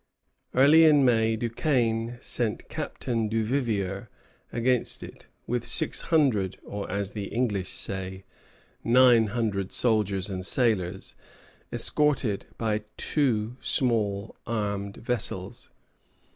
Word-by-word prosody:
Early 150 +5 +7
in 145 -3 +5
May, 115 -2 +3
Duquesnel 115 -1 0
sent 115 -3 -3
Captain 115 -3 -3
Duvivier 110 -4 -1 0.4
against 125 +1 0
it, - - -12 0.2
with 120 0 -2
six 160 - +3
hundred, 125 - +2
or, 100 0 -6
as 100 +1 -2
the 105 -2 -5
English 105 -5 -1
say, 95 0 -3 0.6
nine 120 -2 +5
hundred 100 -3 -2
soldiers 105 -5 +1
and 95 -2 -5
sailors, 95 -5 0 0.6
escorted 140 -9 +1
by 110 -1 -1 0.2
two 120 -5 0
small 110 -5 0
armed 100 -3 -3
vessels. 100 -6 -3
115 Hz, 105 wpm, -27 LUFS, 100-125 Hz, 0.6 s, Early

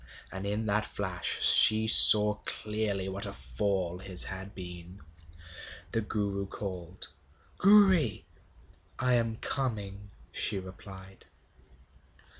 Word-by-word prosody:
And 95 +1 -7
in 105 +2 -4
that 105 +1 -2
flash 95 -4 -4
she 110 0 +5
saw 105 -1 +9
clearly 105 -3 -3
what 100 +2 -5
a 100 - -9
fall 90 +7 -5
his 95 -1 -3
had 95 +1 -5
been. 90 0 -11 0.9
The 115 - -2
Guru 100 -2 -5
called: 90 -3 -9 0.5
'Gouri.' 190 - +2 0.7
'I 125 -1 0
am 115 -2 -1
coming,' 105 -6 -4 0.2
she 105 - -2
replied. 95 0 -12
100 Hz, 105 wpm, -27 LUFS, 95-110 Hz, 0.9 s, saw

